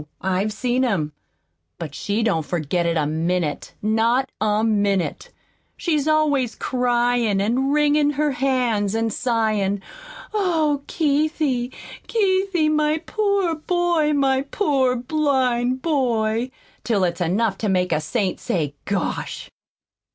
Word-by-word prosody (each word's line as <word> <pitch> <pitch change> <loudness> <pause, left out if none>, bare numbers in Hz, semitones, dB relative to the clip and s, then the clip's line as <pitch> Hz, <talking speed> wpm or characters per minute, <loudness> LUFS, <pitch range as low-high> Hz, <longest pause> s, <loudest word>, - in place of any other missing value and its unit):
I've 190 +3 0
seen 250 +3 0
him. 190 -12 0 0.7
But 155 -4 -6
she 205 +9 -1
don't 165 -8 +1
forget 170 +2 -1
it 170 -1 +1
a 150 - +1
minute 160 0 -2
not 230 +5 +2
a 215 0 +2
minute. 205 -4 0 0.5
She's 305 -4 0
always 290 -6 +2
cryin' 245 -4 +1
an' 240 +7 +1
wringin' 295 0 +3
her 295 +1 +1
hands, 245 -6 0
an' 225 0 0
sighin', 215 -5 0 0.5
'Oh, 320 -8 +1
Keithie, 295 -5 0 0.4
Keithie, 380 -6 +1
my 305 0 +2
poor 400 -5 +1
boy, 335 -1 +1
my 270 -2 +2
poor 275 -4 +1
blind 255 -2 0
boy!' 240 -6 0 0.3
till 210 -5 +1
it's 175 0 -1
enough 195 +4 0
to 215 - -1
make 180 -1 +1
a 155 - +1
saint 185 +4 -1
say, 150 -5 -2
'Gosh!'" 195 -3 -3
245 Hz, 120 wpm, -22 LUFS, 200-295 Hz, 0.7 s, wringin